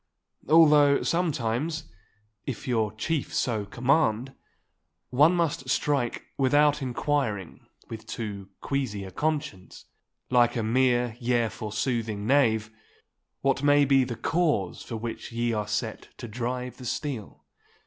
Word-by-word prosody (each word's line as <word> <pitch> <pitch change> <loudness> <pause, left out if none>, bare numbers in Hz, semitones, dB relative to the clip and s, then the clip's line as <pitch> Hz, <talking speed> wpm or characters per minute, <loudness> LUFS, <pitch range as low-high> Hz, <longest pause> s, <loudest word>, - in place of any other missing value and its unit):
Although 150 -3 +6
sometimes, 155 -2 -1 0.6
if 135 -2 -5
your 110 -4 +1
chief 140 +7 -2
so 110 -5 0
command, 130 0 +1 0.8
one 150 +7 +5
must 150 -6 -1
strike 140 -3 0
without 145 +2 +3
inquiring 120 - -2 0.2
with 110 0 -9
too 100 -4 -6
queasy 130 -8 -2
a 95 - -8
conscience, 145 - -3 0.5
like 120 -1 +4
a 115 - -1
mere 120 0 +2
yea 120 -2 +1
forsoothing 110 0 -3
knave, 110 -4 +2 0.7
what 135 0 +1
may 145 0 +5
be 135 -1 +4
the 125 -2 -4
cause 145 - 0
for 115 - -6
which 115 +1 -6
ye 120 0 -1
are 105 -2 -2
set 105 +1 -3
to 120 - -7
drive 125 +3 -4
the 125 - -10
steel. 125 -3 -5
125 Hz, 125 wpm, -27 LUFS, 110-145 Hz, 0.8 s, Although